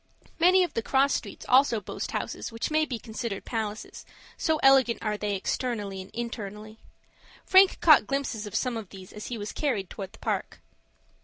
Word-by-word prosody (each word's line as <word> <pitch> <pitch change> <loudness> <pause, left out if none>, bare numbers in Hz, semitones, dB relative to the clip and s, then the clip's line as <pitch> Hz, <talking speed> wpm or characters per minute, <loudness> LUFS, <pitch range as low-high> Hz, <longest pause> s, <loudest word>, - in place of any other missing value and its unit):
Many 365 +2 +6
of 350 - -3
the 230 - -1
cross 270 +4 +2
streets 200 - -5
also 255 -3 +4
boast 200 - -6
houses - - -4
which 230 +6 -4
may 310 0 +3
be 255 -6 -4
considered 220 -2 -5
palaces, 220 -2 -5 0.3
so 315 -2 0
elegant 270 -3 +5
are 215 -1 0
they 205 -1 -2
externally 205 -1 -3
and 190 - -12
internally. 215 -2 -6 0.7
Frank 380 0 +6
caught 310 -4 +6
glimpses 265 -6 -2
of 205 - -8
some 250 -3 0
of 215 -5 -7
these 190 -2 -12
as 210 - -7
he 240 - -4
was 205 0 -5
carried 230 - -2
towards 195 -2 -7
the - - -14
Park. - - -3
230 Hz, 180 wpm, -27 LUFS, 210-270 Hz, 0.7 s, Many